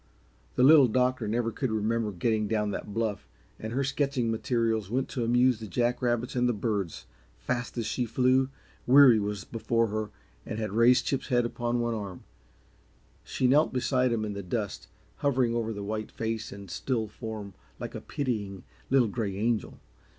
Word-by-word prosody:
The 125 - +3
Little 140 -1 +8
Doctor 125 0 +1
never 115 +2 0
could 130 +2 -2
remember 110 0 0
getting 110 +3 0
down 105 -1 0
that 105 - -5
bluff, 105 - -2 0.3
and 110 - -5
her 135 +4 0
sketching 135 -3 0
materials 115 -3 0
went 130 +4 0
to 125 - -2
amuse 120 0 +3
the 110 - -7
jack 120 +5 0
rabbits 120 0 0
and 125 0 +2
the - - +2
birds. 100 -5 -2 0.3
Fast 120 - -3
as 115 - -1
she 110 +3 -1
flew, 130 +3 +2 0.4
Weary 130 -3 +8
was 100 -2 -3
before 115 +2 0
her 110 0 -3 0.3
and 110 - -5
had 110 -2 -3
raised 120 +4 +4
Chip's 135 - -1
head 120 -3 +2
upon 120 0 -1
one 120 0 0
arm. 100 -5 -6 1.0
She - - -2
knelt 145 +5 +4
beside 130 0 +1
him 110 -2 0
in 105 - -4
the 100 - -5
dust, 100 +2 -4 0.3
hovering 130 -4 +1
over 115 -1 -1
the 100 -2 -5
white 110 +1 -3
face 110 -1 -4
and 100 -3 -9
still 115 -5 -1
form 105 -2 -7 0.3
like - - -6
a - - -6
pitying, 105 - -3 0.3
little 130 -3 +4
gray 100 -3 -3
angel. 115 +1 -1
115 Hz, 180 wpm, -28 LUFS, 105-125 Hz, 1.0 s, Little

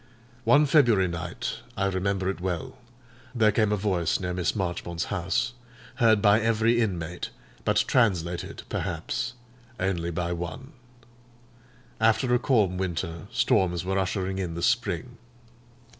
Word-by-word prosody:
One 150 +1 +6
February 120 - +4
night—I 85 +3 -4
remember 95 0 0
it 95 -2 -2
well—there 120 +5 -3
came 105 0 +2
a - - +3
voice 95 -5 0
near 90 -2 -3
Miss 90 +3 -1
Marchmont's 85 -3 -2
house, 95 +5 0 0.4
heard 110 -3 +4
by 105 +1 +5
every 115 +1 +2
inmate, 90 -5 -2 0.4
but - - +3
translated, 90 -8 0
perhaps, - - -3 0.5
only 90 -3 -1
by 85 +1 -2
one. 85 - -6 1.3
After 115 +3 +3
a 125 - +4
calm 105 -9 +2
winter, 85 -3 -3
storms 90 -1 +2
were 95 +1 0
ushering 95 0 -1
in 85 -3 -3
the 85 - -4
spring. 120 +3 0
95 Hz, 125 wpm, -26 LUFS, 90-115 Hz, 1.3 s, One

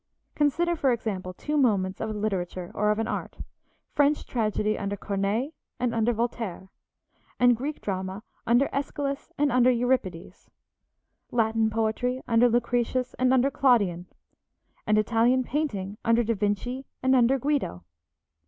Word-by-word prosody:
Consider, 340 +4 +1
for 275 -5 +2
example, 200 -6 -3
two 295 +11 -4
moments 195 -8 +1
of - - -2
a - - -3
literature 185 -4 -3
or 210 +1 +1
of 210 - +2
an 225 0 -1
art, - - -4 0.6
French 290 +1 +2
tragedy 215 -2 0
under 200 0 -3
Corneille 200 +8 -1 0.3
and 245 -1 0
under 230 +1 +2
Voltaire, 225 -5 -3 0.7
and 245 -1 +5
Greek 285 +6 -5
drama 190 +1 -4 0.2
under 240 +4 +4
Æschylus 280 0 -3
and 290 -1 +2
under 250 0 +5
Euripides, 240 -8 -1 0.8
Latin 225 -1 +1
poetry 225 +3 -1
under 235 +1 +4
Lucretius 245 +1 0
and 255 0 +3
under 260 +1 +3
Claudian, 200 -11 +2 0.8
and 215 0 +3
Italian 235 +4 +3
painting 215 -8 -3
under 230 +1 +3
Da 230 +1 0
Vinci 215 +6 -2 0.2
and 260 0 +4
under 250 +2 +4
Guido. 275 - -1
230 Hz, 140 wpm, -26 LUFS, 210-255 Hz, 0.8 s, and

